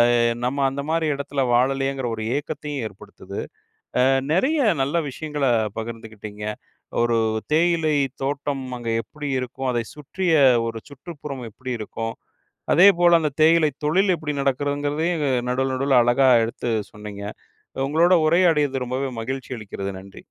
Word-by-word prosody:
அ - - +3 0.3
நம்ம 140 +2 0
அந்த 140 +1 -4
மாரி 165 0 +1
எடத்துல 140 0 -3
வாழலையேங்கிற 135 +1 +1
ஒரு 110 - -5
ஏக்கத்தையும் 145 -1 -4
ஏற்படுத்துது. 100 - -10 0.6
அ - - +5 0.3
நெறைய 265 - +2 0.3
நல்ல 140 +5 -2
விஷயங்களப் 130 -8 -1
பகிர்ந்துக்கிட்டீங்க. 110 -2 -7 0.6
ஒரு 120 -1 +2 0.3
தேயிலைத் 155 -5 +2
தோட்டம் 140 0 -2
அங்கே 115 -1 -3
எப்டி 150 +2 -7
இருக்கும்? 130 +1 -4
அதைச் 120 -2 -3
சுற்றிய 165 +4 -2 0.3
ஒரு 115 0 -4
சுற்றுப்புறம் 140 -2 -8
எப்டி 130 +4 -7
இருக்கும்? 115 +1 -4 0.6
அதேபோல, 175 -1 +6
அந்த 150 -2 0
தேயிலை 160 -1 +5
தொழில் 185 +5 +3
எப்டி 150 -2 -4
நடக்கிறதுங்கிறதையும், 145 +4 0 0.3
நடுவுல 130 +1 0
நடுவுல 130 -1 +4
அழகா 130 +2 +4 0.2
எடுத்துச் 115 -2 -3
சொன்னீங்க. 105 -1 -8 0.6
உங்களோட 170 +5 +4
உரையாடியது 150 -6 +3
ரொம்பவே 130 +2 -2
மகிழ்ச்சி 130 +2 -5
அளிக்கிறது. 100 -2 -5
நன்றி. 95 +1 -13
135 Hz, 125 wpm, -23 LUFS, 120-155 Hz, 0.6 s, அதேபோல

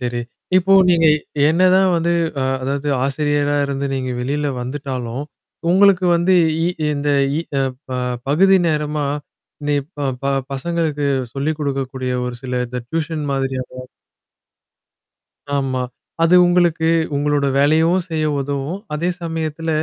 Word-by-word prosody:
சரி. 120 -1 -2 0.4
இப்போ 190 +1 +3 0.2
நீங்க 165 -2 +4
எ - - -4 0.3
என்னதான் 185 +3 +4
வந்து 170 +1 0 0.3
அ - - +1 0.2
அதாவது 140 +2 -2 0.2
ஆசிரியரா 145 +1 0
இருந்து 140 0 -2
நீங்க 130 -1 -3
வெளில 145 +4 -1
வந்துட்டாலும், 130 -1 -4 0.5
உங்களுக்கு 190 0 +5
வந்து 175 +2 +2 0.3
இ - - +2 0.3
இந்த 145 0 -2 0.3
இ - - 0 0.2
அ - - +2 0.3
ப 130 - -5 0.4
பகுதி 190 +6 +5
நேரமா, 150 -1 -1 0.6
நீ 145 - +2 0.2
ப - - -4 0.2
ப 140 0 +1 0.2
பசங்களுக்கு 150 0 -1 0.3
சொல்லி் 140 +3 -1
குடுக்கக்கூடிய 135 -2 -2
ஒரு 125 - -5
சில 125 -1 -2
இந்த 125 +1 -5
டியூஷன் 160 -1 -2
மாதிரியான 130 -1 -3 1.8
ஆமா. 130 -2 -1 0.4
அது 165 +2 +5
உங்களுக்கு, 175 -2 +2 0.3
உங்களோட 145 0 +1
வேலையும் 160 +5 +3
செய்ய 160 -1 -1
உதவும். 140 +6 -3
அதே 165 +4 -1
சமயத்தில, 165 -1 -3
145 Hz, 125 wpm, -19 LUFS, 135-165 Hz, 1.8 s, உங்களுக்கு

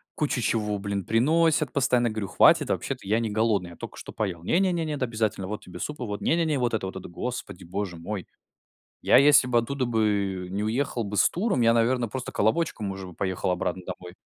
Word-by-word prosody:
кучу 145 -3 0
чего, 105 -2 0
блин, 100 -1 -3
приносят 155 +5 +2
постоянно. 125 -3 +2
Я 110 - -2
говорю: 110 -2 -3
"Хватит, - - +5
вообще-то - - -3
я 110 +3 +2
не 115 -1 -1
голодный, 105 -4 0
я - - -12
только - - -9
что - - -9
поел". 95 -6 -3
"Не 165 - +2
не, 190 -2 +2
нет, 155 -5 -2
обязательно. 110 -5 -1
Вот 105 +2 -5
тебе 90 -1 -10
суп 150 +7 -5
и - - -3
вот. 105 -3 -4
Не 165 - +2
не 170 - +2
не 155 -3 0
вот 120 -2 0
это, 110 -4 -1
вот 95 - -7
это". 95 -2 -7
Господи 90 -1 -6
боже 95 0 -4
мой. 95 +3 -5 0.7
Я - - +4
если 140 -2 +6
бы 120 -1 +3
оттуда 130 +3 -2
бы 100 -5 0
не 100 +2 -2
уехал 120 +1 -1
бы 100 +1 -5
с - - +4
туром, 190 - 0
я, 115 0 +5
наверно, 120 0 +2
просто 130 +2 -5
колобочком 110 -3 0
уже 95 -1 -7
бы 90 - -11
поехал 95 0 -1
обратно 90 +1 -2
домой. 90 0 -8
110 Hz, 225 wpm, -26 LUFS, 95-130 Hz, 0.7 s, если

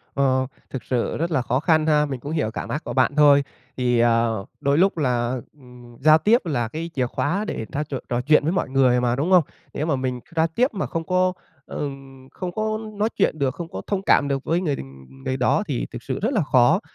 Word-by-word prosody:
Ờ, 130 -1 +2 0.2
thực 130 - -6
sự 125 -2 -1
rất 170 +2 -2
là 135 - +2
khó 125 +2 0
khăn 160 -1 +2
ha. 150 -1 +4
Mình 135 -3 -5
cũng 145 +5 -7
hiểu 150 -9 -1
cảm - - -6
ác 150 +3 -3
của - - -5
bạn 135 +2 +2
thôi. 145 -2 +6 0.3
Thì, 125 -2 +1
à, 115 0 +3 0.4
đôi 140 +1 +2
lúc 190 0 +3
là, 125 -3 0 0.2
ừm, 125 -4 -16
giao 155 +2 +7
tiếp 215 +4 +2
là 120 -8 -1
cái 165 +7 -5
chìa 130 -3 0
khóa 185 - -1
để 110 - -4
ta 150 +2 -2
trò 140 -2 -5
trò 120 0 0
chuyện 150 +2 +4
với 160 - +1
mọi 185 - -1
người 130 -2 +3
mà, 120 0 +1
đúng 155 +8 -1
hông? 180 -3 +6 0.3
Nếu 150 - -2
mà 150 -4 +1
mình 130 -1 -2 0.2
giao 160 0 +3
tiếp 235 +11 +1
mà 195 - -2
không 165 -1 -3
có, 185 +1 +2 0.3
ờ, - - -7 0.5
không 180 -2 -5
có 215 +2 -2
nói 210 +2 0
chuyện 155 - +1
được, 135 -1 0
không 170 +1 -6
có - - -6
thông 195 -2 -1
cảm 145 - +4
được 135 -1 -2
với 170 +3 0
người 150 -6 0
đ - - -9 0.5
người 130 0 -1
đó, 130 +10 +2
thì 135 -5 -2
thực 120 - -8
sự 130 - -3
rất 240 +6 0
là 200 -8 +2
khó. 140 +7 +4
145 Hz, 245 wpm, -23 LUFS, 130-165 Hz, 0.5 s, giao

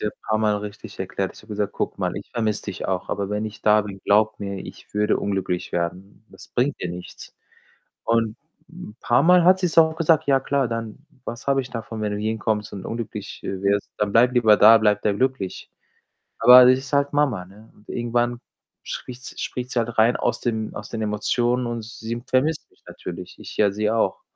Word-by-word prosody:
ihr 105 - -1 0.2
paarmal 110 -1 +1
richtig 105 0 -9
erklärt. 95 0 -3
Ich - - -14
habe 110 - -20
gesagt: 105 -1 -2
„Guck - - -3
mal, - - -1
ich - - -8
vermisse 110 -3 -1
dich 100 -3 -5
auch, 95 -2 -2
aber 100 -1 -2
wenn 105 +1 -1
ich 110 0 -7
da 105 0 +4
bin, 100 -2 -8
glaube 110 +1 +4
mir, 100 -1 -5
ich - - -12
würde 105 0 +2
unglücklich 95 -3 -2
werden. 90 +5 -4
Das - - -14
bringt 130 +3 -1
dir 90 - -3
nichts.“ 90 +1 -9 0.7
Und 115 -1 +1 0.3
'n 105 - -11
paarmal 175 +9 +4
hat 185 +1 +6
sie's 180 -4 -1
auch 160 -1 +6
gesagt: 165 -1 +3
„Ja 135 -1 +4
klar, 135 -1 0
dann 115 +4 -6 0.2
was 120 +3 -7
habe 135 -1 +3
ich 130 - -9
davon, 115 -2 -6
wenn 105 -1 -1
du 105 - -2
hierhin 110 +1 -2
kommst 105 0 -2
und 95 -2 -7
unglücklich, 110 -3 -6
äh, 95 -1 -4
wirst? 100 0 +1
Dann 105 -1 0
bleib 120 +4 +4
lieber 110 -4 +5
da, 110 +2 +8
bleib 105 -2 +2
da 105 - +1
glücklich.“ 130 -4 -2 0.7
Aber 125 +2 +9
das 130 +1 +5
ist 135 0 -11
halt 140 0 +2
Mama, 130 -11 +1
ne, 105 +4 -17
und 105 - -22
irgendwann 120 0 -1 0.4
spricht 125 0 -7
s - - -8
spricht 125 0 -4
sie 120 - +1
halt 115 0 -3
rein 115 +2 +4
aus 120 0 -1
dem 110 -3 -2
aus - - -8
den 115 - -4
Emotionen 120 +4 0
und 120 -1 -4
sie 115 +1 -6
vermisst 145 +5 0
mich - - -30
natürlich. - - -8
Ich - - -10
ja 105 -2 +4
sie 105 +2 -1
auch. 115 0 0
110 Hz, 210 wpm, -23 LUFS, 105-125 Hz, 0.7 s, Aber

